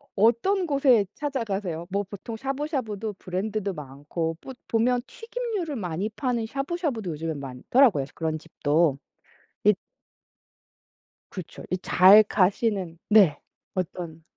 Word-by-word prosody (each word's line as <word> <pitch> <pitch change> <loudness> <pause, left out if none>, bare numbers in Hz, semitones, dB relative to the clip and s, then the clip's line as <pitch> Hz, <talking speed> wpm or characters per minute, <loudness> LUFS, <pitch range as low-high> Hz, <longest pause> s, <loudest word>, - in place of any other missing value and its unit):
어떤 240 - +3
곳에 270 -7 +4
찾아가세요? 205 - -3
뭐 200 +2 0
보통 200 +3 -8
샤브샤브도 260 - -3
브랜드도 195 +2 -3
많고 150 +3 -4
뿌 265 - -8
보면 245 +2 +2
튀김류를 455 - -4
많이 185 -2 -2
파는 235 0 -1
샤브샤브도 275 - -2
요즘에 160 +1 -3
많더라고요. 140 - +2
그런 160 -1 -1
집도. 155 -2 +1 0.7
이 210 - +6 1.6
그렇죠. 185 -4 -8
이 185 - +1
잘 195 +5 +7
가시는 195 -3 +1
네. 195 -9 +6 0.3
어떤 170 -3 -4
205 Hz, 265 characters per minute, -26 LUFS, 170-250 Hz, 1.6 s, 잘